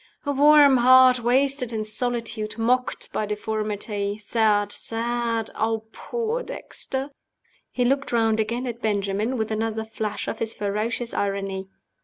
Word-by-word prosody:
"A 285 - 0
warm 285 -1 +6
heart 255 +1 +6
wasted 255 +1 +1
in 220 -1 -2
solitude, 220 -1 -2
mocked 250 +3 0
by 215 - -1
deformity. 210 -1 -3
Sad! 210 -1 +1
sad! 230 0 -2
Ah, 225 0 0
poor 470 - -3
Dexter!" 270 - -5 0.6
He 250 - -1
looked 275 +2 0
round 225 -2 +2
again 235 +4 -1
at 240 -1 -5
Benjamin, 205 +3 -1
with 220 -1 -2
another 220 0 -2
flash 220 -1 -4
of - - -4
his 225 0 -2
ferocious 215 +4 -2
irony. 195 -1 -2
225 Hz, 135 wpm, -24 LUFS, 215-250 Hz, 0.6 s, warm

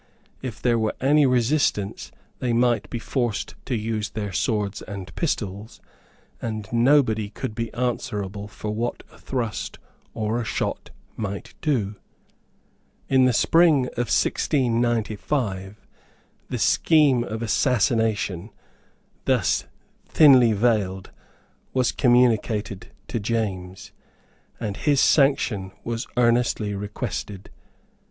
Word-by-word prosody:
If 125 -5 -6
there 120 -2 +2
were 110 -1 -1
any 145 +2 +4
resistance 125 -5 0 0.3
they 125 -2 0
might 120 -2 +2
be - - -3
forced 120 -1 -2
to 125 - -1
use 110 -1 -2
their 105 -2 -5
swords 105 +1 -1
and 100 -3 -8
pistols, 105 - -3 0.6
and 110 -3 -4
nobody 115 -4 +3
could 105 - -5
be 115 0 -4
answerable 105 -5 -3
for 105 0 -6
what 115 +3 -3
a - - -18
thrust 115 -9 -4 0.4
or 110 +2 -1
a - - -3
shot 110 - -3 0.3
might 100 -2 -5
do. 110 -10 0 1.1
In 130 -1 +5
the 130 - +4
spring 160 +1 +4
of 120 -2 -3
1695, 115 -5 0 0.7
the - - -2
scheme 145 -7 +4
of 110 0 -5
assassination, 115 - +1 0.8
thus - - +1 0.4
thinly 130 -7 +6
veiled, 100 -4 0 0.6
was 130 -2 +2
communicated 115 -5 +2 0.2
to 115 - -2
James, 100 -4 -3 0.7
and 105 -3 -4
his 145 -3 +2
sanction 125 -11 +3
was 115 0 -3
earnestly 120 -3 +2
requested. 100 -1 -5
115 Hz, 110 wpm, -24 LUFS, 105-125 Hz, 1.1 s, thinly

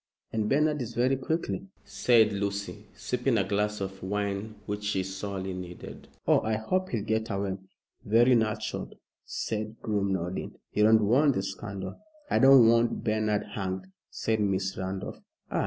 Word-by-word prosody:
"And 110 -1 0
Bernard 150 +1 +2
is 120 -1 -5
very 125 +3 +3
quick," 160 +5 -1 0.4
said 110 -4 +4
Lucy, 100 0 -3
sipping 125 -1 0
a 100 - +3
glass 105 +1 0
of 95 0 -5
wine 100 +2 -2
which 105 0 -4
she 100 -2 0
sorely 95 0 -4
needed. 90 -1 -8 0.2
"Oh, - - +5
I 110 0 0
hope 185 +13 -1
he'll 110 -4 -2
get 110 +1 0
away!" 100 -2 -2 0.4
"Very 120 +4 +5
natural," 110 -3 0 0.3
said 110 +1 -4
Groom, 100 -3 0
nodding. 90 0 -3 0.2
"You 105 - +3
don't 110 -1 +5
want 135 +6 +4
the 95 - 0
scandal." 95 0 -6 0.3
"I - - +4
don't 135 -3 +8
want 115 +1 +3
Bernard 110 -1 +1
hanged," 95 -2 -3 0.2
said 110 -1 -1
Miss 95 -2 0
Randolph. 95 +1 -4 0.3
"Ah! - - 0
105 Hz, 155 wpm, -28 LUFS, 100-115 Hz, 0.4 s, don't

